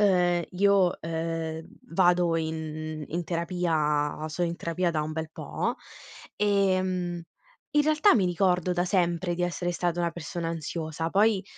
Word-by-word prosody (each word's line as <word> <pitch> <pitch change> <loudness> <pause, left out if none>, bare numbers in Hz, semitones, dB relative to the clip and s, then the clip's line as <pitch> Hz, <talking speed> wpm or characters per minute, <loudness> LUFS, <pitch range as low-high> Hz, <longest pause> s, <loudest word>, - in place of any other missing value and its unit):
ehm, 180 -3 +3
io, 190 -1 +3
ehm, 165 0 -3 0.3
vado 175 -1 +3
in 155 -1 -4
in 175 +2 -3
terapia, 160 -4 0
sono 170 +2 -1
in 170 - -4
terapia 170 +1 -1
da 155 -2 -1
un 155 +1 -4
bel 160 0 -4
po' - - -3 0.6
ehm, 185 -4 +1 0.5
in 295 - +6
realtà 310 +6 +4
mi 190 -5 +3
ricordo 180 0 +1
da 175 0 +1
sempre 175 -2 +1
di 180 - -1
essere 175 0 -1
stata 175 0 -1
una 170 -1 +1
persona 170 0 -5
ansiosa, 160 0 -3
poi, 205 -1 +3
175 Hz, 145 wpm, -27 LUFS, 160-180 Hz, 0.6 s, in